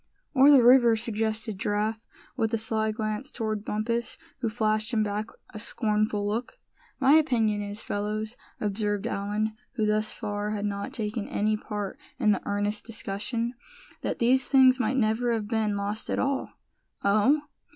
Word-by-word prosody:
"Or 275 Hz, 0 st, +7 dB
the 275 Hz, -4 st, +7 dB
river," 240 Hz, -1 st, +7 dB
suggested 220 Hz, -2 st, -2 dB
Giraffe, 215 Hz, +2 st, -1 dB, 0.3 s
with 225 Hz, -4 st, 0 dB
a -, -, 0 dB
sly 220 Hz, 0 st, 0 dB
glance 215 Hz, +4 st, -3 dB
toward 215 Hz, -3 st, -3 dB
Bumpus, 230 Hz, +3 st, -2 dB, 0.2 s
who 235 Hz, -4 st, -1 dB
flashed 215 Hz, +1 st, 0 dB
him 220 Hz, -3 st, +2 dB
back 210 Hz, +1 st, -2 dB, 0.3 s
a 215 Hz, -, -6 dB
scornful 210 Hz, -2 st, 0 dB
look. 230 Hz, +4 st, -3 dB, 0.4 s
"My 275 Hz, +1 st, +5 dB
opinion 230 Hz, -9 st, +3 dB
is, 205 Hz, +1 st, -4 dB
fellows," 215 Hz, +2 st, -3 dB, 0.2 s
observed 205 Hz, -1 st, -1 dB
Allan, 210 Hz, +2 st, -1 dB, 0.2 s
who 220 Hz, -3 st, 0 dB
thus 215 Hz, 0 st, +1 dB
far 205 Hz, 0 st, -3 dB
had 210 Hz, -1 st, -2 dB
not 200 Hz, 0 st, -3 dB
taken 210 Hz, -1 st, -3 dB
any 215 Hz, +1 st, +1 dB
part 210 Hz, -2 st, -5 dB, 0.2 s
in 210 Hz, -, +3 dB
the 200 Hz, -, +1 dB
earnest 205 Hz, +1 st, -1 dB
discussion, 230 Hz, +2 st, -3 dB, 0.5 s
"that -, -, -2 dB
these 255 Hz, +3 st, +4 dB
things 260 Hz, -1 st, +6 dB
might 255 Hz, +3 st, +1 dB
never 235 Hz, +1 st, +1 dB
have 215 Hz, -2 st, -2 dB
been 215 Hz, -2 st, 0 dB
lost 205 Hz, +2 st, -2 dB
at -, -, 0 dB
all." 275 Hz, 0 st, -1 dB, 0.5 s
"Oh! 215 Hz, +9 st, +3 dB
215 Hz, 160 wpm, -27 LUFS, 210-235 Hz, 0.5 s, Or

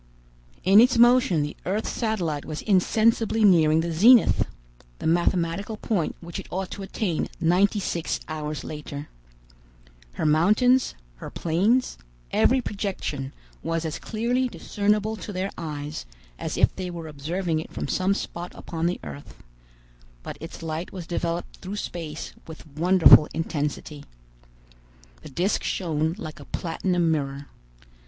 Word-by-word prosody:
In 195 Hz, +4 st, +7 dB
its 245 Hz, 0 st, +4 dB
motion 240 Hz, -, +5 dB
the 145 Hz, -, -5 dB
earth's 205 Hz, +4 st, -1 dB
satellite 180 Hz, -, -1 dB
was 155 Hz, -1 st, -6 dB
insensibly 220 Hz, +3 st, +2 dB
nearing 160 Hz, -4 st, +5 dB
the 170 Hz, +1 st, -2 dB
zenith, 225 Hz, +9 st, +5 dB, 0.5 s
the -, -, -8 dB
mathematical 175 Hz, +4 st, +1 dB
point 200 Hz, -7 st, -1 dB
which 170 Hz, -1 st, -7 dB
it -, -, -8 dB
ought 190 Hz, 0 st, -4 dB
to 200 Hz, -, -6 dB
attain 190 Hz, -3 st, -2 dB
ninety 190 Hz, +5 st, +3 dB
six 170 Hz, -4 st, -2 dB
hours 155 Hz, -1 st, -4 dB
later. 150 Hz, -1 st, -7 dB, 1.0 s
Her -, -, -3 dB
mountains, 210 Hz, +12 st, +3 dB, 0.2 s
her -, -, -8 dB
plains, 200 Hz, +10 st, +1 dB, 0.3 s
every 260 Hz, 0 st, +3 dB
projection 190 Hz, -, -4 dB, 0.3 s
was 165 Hz, 0 st, -2 dB
as 155 Hz, -1 st, -3 dB
clearly 240 Hz, +3 st, 0 dB
discernible 210 Hz, -1 st, -1 dB
to 210 Hz, -, -7 dB
their 190 Hz, +1 st, -3 dB
eyes 150 Hz, -, -6 dB, 0.3 s
as -, -, -3 dB
if -, -, +3 dB
they 185 Hz, -1 st, -4 dB
were 170 Hz, -2 st, -6 dB
observing 160 Hz, +3 st, -2 dB
it 160 Hz, -, -8 dB
from -, -, -4 dB
some 190 Hz, +2 st, +1 dB
spot 175 Hz, -3 st, -6 dB
upon 165 Hz, 0 st, -3 dB
the 175 Hz, -, -2 dB
earth; 70 Hz, -1 st, -10 dB, 0.8 s
but -, -, -6 dB
its 165 Hz, +1 st, -8 dB
light 160 Hz, +2 st, -4 dB
was 180 Hz, -3 st, -7 dB
developed 170 Hz, 0 st, -3 dB
through 190 Hz, +2 st, -6 dB
space 165 Hz, -6 st, -5 dB
with 160 Hz, 0 st, -10 dB
wonderful 160 Hz, +1 st, +6 dB
intensity. 150 Hz, -2 st, -3 dB, 1.2 s
The -, -, -10 dB
disc 180 Hz, +9 st, 0 dB
shone 160 Hz, -2 st, -1 dB
like 155 Hz, -1 st, -7 dB
a -, -, -11 dB
platinum 175 Hz, 0 st, 0 dB
mirror. 140 Hz, -2 st, -3 dB
175 Hz, 140 wpm, -25 LUFS, 155-205 Hz, 1.2 s, In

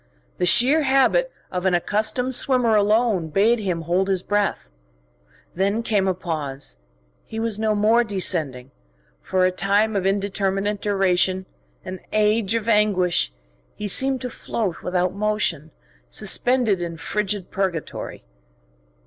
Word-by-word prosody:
The 180 Hz, -, +1 dB
sheer 270 Hz, -, +6 dB
habit 275 Hz, -, +2 dB, 0.2 s
of 180 Hz, 0 st, -2 dB
an 180 Hz, -, +2 dB
accustomed 220 Hz, +8 st, -1 dB
swimmer 245 Hz, -3 st, +3 dB
alone 210 Hz, -3 st, +2 dB
bade 210 Hz, +9 st, +2 dB
him 180 Hz, -5 st, -2 dB
hold 175 Hz, +4 st, 0 dB
his 190 Hz, -2 st, 0 dB
breath. 205 Hz, 0 st, -1 dB, 0.9 s
Then 200 Hz, +5 st, -1 dB
came 205 Hz, -4 st, 0 dB
a 185 Hz, -, 0 dB
pause: 145 Hz, -, -5 dB, 0.5 s
he 220 Hz, -, -7 dB
was 225 Hz, -2 st, -1 dB
no 220 Hz, -1 st, 0 dB
more 220 Hz, +3 st, +3 dB
descending; 155 Hz, -, 0 dB, 0.5 s
for 185 Hz, -, 0 dB
a 185 Hz, -, +2 dB
time 200 Hz, +4 st, 0 dB
of 190 Hz, -1 st, 0 dB
indeterminate 195 Hz, +1 st, -1 dB
duration, 190 Hz, -2 st, +1 dB, 0.4 s
an 185 Hz, 0 st, -6 dB
age 215 Hz, 0 st, +1 dB
of 225 Hz, -1 st, -2 dB
anguish, 195 Hz, -, +2 dB, 0.4 s
he 210 Hz, -, -5 dB
seemed 265 Hz, +6 st, +3 dB
to 250 Hz, -1 st, -4 dB
float 205 Hz, -8 st, -4 dB
without 180 Hz, 0 st, -1 dB
motion, 200 Hz, -7 st, -1 dB, 0.4 s
suspended 235 Hz, -, +1 dB
in 170 Hz, -1 st, -5 dB
frigid 205 Hz, +1 st, -3 dB
purgatory. 190 Hz, -5 st, -4 dB
200 Hz, 130 wpm, -22 LUFS, 180-220 Hz, 0.9 s, sheer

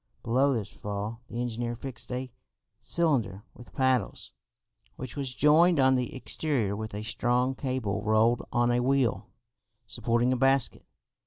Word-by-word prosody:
Below 130 Hz, +5 st, +2 dB
this 110 Hz, -5 st, -3 dB
fall 105 Hz, +3 st, -5 dB
the 120 Hz, -, -6 dB
engineer 120 Hz, 0 st, -3 dB
fixed 125 Hz, 0 st, -6 dB
a 125 Hz, 0 st, -4 dB, 0.5 s
cylinder 120 Hz, -, 0 dB
with 120 Hz, -, -14 dB
paddles, 130 Hz, -5 st, 0 dB, 0.6 s
which 130 Hz, -2 st, -7 dB
was 135 Hz, -3 st, -4 dB
joined 160 Hz, +3 st, +5 dB
on 130 Hz, 0 st, +5 dB
the 125 Hz, 0 st, -1 dB
exterior 130 Hz, -5 st, -1 dB
with 110 Hz, 0 st, -6 dB
a 105 Hz, -, -4 dB
strong 125 Hz, +3 st, 0 dB
cable 125 Hz, -6 st, -2 dB
rolled 110 Hz, +2 st, +3 dB
on 120 Hz, 0 st, +2 dB
a 120 Hz, -, +2 dB
wheel, 125 Hz, -6 st, +1 dB, 0.6 s
supporting 120 Hz, +2 st, +1 dB
a -, -, -1 dB
basket. 135 Hz, 0 st, +1 dB
120 Hz, 145 wpm, -28 LUFS, 110-130 Hz, 0.6 s, joined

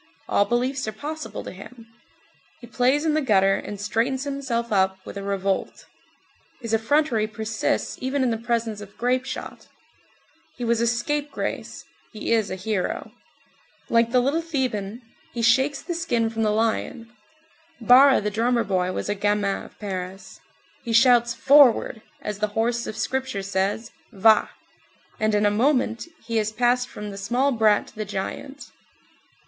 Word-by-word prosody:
All 200 Hz, -, +3 dB
beliefs 255 Hz, +2 st, -1 dB
are -, -, -1 dB
possible 305 Hz, +7 st, -6 dB
to -, -, -7 dB
him. 230 Hz, +5 st, -12 dB, 0.7 s
He 240 Hz, -, -11 dB
plays 255 Hz, +5 st, +1 dB
in 315 Hz, -, +2 dB
the 310 Hz, -, +2 dB
gutter, 195 Hz, -7 st, +3 dB
and 205 Hz, +1 st, -5 dB
straightens 235 Hz, +6 st, -1 dB
himself 265 Hz, -5 st, -3 dB
up 190 Hz, -1 st, +2 dB
with -, -, -8 dB
a 200 Hz, -, -5 dB
revolt; 195 Hz, -1 st, -2 dB, 0.7 s
his 230 Hz, -3 st, -5 dB
effrontery 225 Hz, -1 st, +2 dB
persists 220 Hz, +1 st, -2 dB
even 260 Hz, +1 st, 0 dB
in 250 Hz, -, +1 dB
the 225 Hz, -, -1 dB
presence 230 Hz, -2 st, -2 dB
of 205 Hz, -1 st, -12 dB
grape 250 Hz, +2 st, 0 dB
shot; -, -, -7 dB, 0.9 s
he 245 Hz, -, -5 dB
was 235 Hz, 0 st, +1 dB
a 235 Hz, -, +2 dB
scapegrace, 290 Hz, +5 st, -3 dB, 0.3 s
he 215 Hz, -, -4 dB
is 220 Hz, -3 st, +2 dB
a 185 Hz, -, -3 dB
hero; 190 Hz, 0 st, -3 dB, 0.8 s
like 230 Hz, 0 st, +3 dB
the 250 Hz, 0 st, +4 dB
little 285 Hz, +6 st, +1 dB
Theban, 250 Hz, -8 st, -3 dB, 0.3 s
he 235 Hz, -, -2 dB
shakes 265 Hz, +5 st, +3 dB
the 350 Hz, -, -3 dB
skin 240 Hz, -10 st, 0 dB
from 225 Hz, 0 st, -3 dB
the 215 Hz, -, +2 dB
lion; 230 Hz, +2 st, -1 dB, 0.7 s
Barra 260 Hz, +4 st, +6 dB
the 210 Hz, 0 st, -2 dB
drummer 235 Hz, +2 st, +1 dB
boy 185 Hz, -2 st, 0 dB
was -, -, -4 dB
a 205 Hz, -, 0 dB
gamin 205 Hz, 0 st, 0 dB
of -, -, -16 dB
Paris; 190 Hz, -2 st, -6 dB, 0.4 s
he 235 Hz, -, -3 dB
Shouts: 235 Hz, 0 st, +5 dB
"Forward!" 265 Hz, -5 st, +5 dB, 0.2 s
as 210 Hz, -1 st, -4 dB
the 215 Hz, -, +1 dB
horse 235 Hz, +1 st, 0 dB
of 215 Hz, -, -6 dB
Scripture 260 Hz, -3 st, -2 dB
says 195 Hz, +4 st, -2 dB, 0.2 s
"Vah!" 215 Hz, 0 st, +4 dB, 0.7 s
and 215 Hz, 0 st, +1 dB
in 210 Hz, 0 st, +2 dB
a 205 Hz, -, +4 dB
moment 240 Hz, +2 st, +1 dB, 0.2 s
he 230 Hz, 0 st, -2 dB
has 215 Hz, 0 st, 0 dB
passed 245 Hz, +2 st, +1 dB
from 210 Hz, 0 st, -7 dB
the 195 Hz, -, -8 dB
small 245 Hz, +8 st, +1 dB
brat 220 Hz, -4 st, +3 dB
to -, -, -21 dB
the 215 Hz, -, -3 dB
giant. 210 Hz, +7 st, -6 dB
230 Hz, 165 wpm, -24 LUFS, 210-255 Hz, 0.9 s, Barra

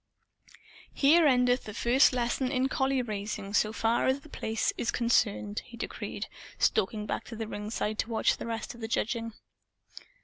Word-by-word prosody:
"Here 310 Hz, +3 st, +5 dB
endeth 250 Hz, -1 st, +3 dB
the 215 Hz, -, -7 dB
first 255 Hz, +5 st, +4 dB
lesson 250 Hz, +1 st, 0 dB
in 260 Hz, -1 st, +1 dB
collie 265 Hz, -1 st, +1 dB
raising, 205 Hz, -2 st, -4 dB
so 215 Hz, 0 st, +3 dB
far 225 Hz, +1 st, +1 dB
as 265 Hz, +2 st, +1 dB
The 310 Hz, -, -15 dB
Place 220 Hz, -5 st, -1 dB
is 235 Hz, -, -2 dB
concerned," 105 Hz, -, +1 dB
he -, -, -12 dB
decreed, -, -, -5 dB, 0.3 s
stalking 210 Hz, +2 st, +1 dB
back 215 Hz, -, -3 dB
to 230 Hz, -, -8 dB
the 225 Hz, 0 st, -4 dB
ringside 210 Hz, 0 st, -3 dB
to 225 Hz, -, -1 dB
watch 225 Hz, -, +2 dB
the -, -, -6 dB
rest 230 Hz, -1 st, -4 dB
of 235 Hz, -, -13 dB
the 225 Hz, -, -3 dB
judging. 230 Hz, 0 st, -1 dB
230 Hz, 170 wpm, -29 LUFS, 215-255 Hz, 0.3 s, Here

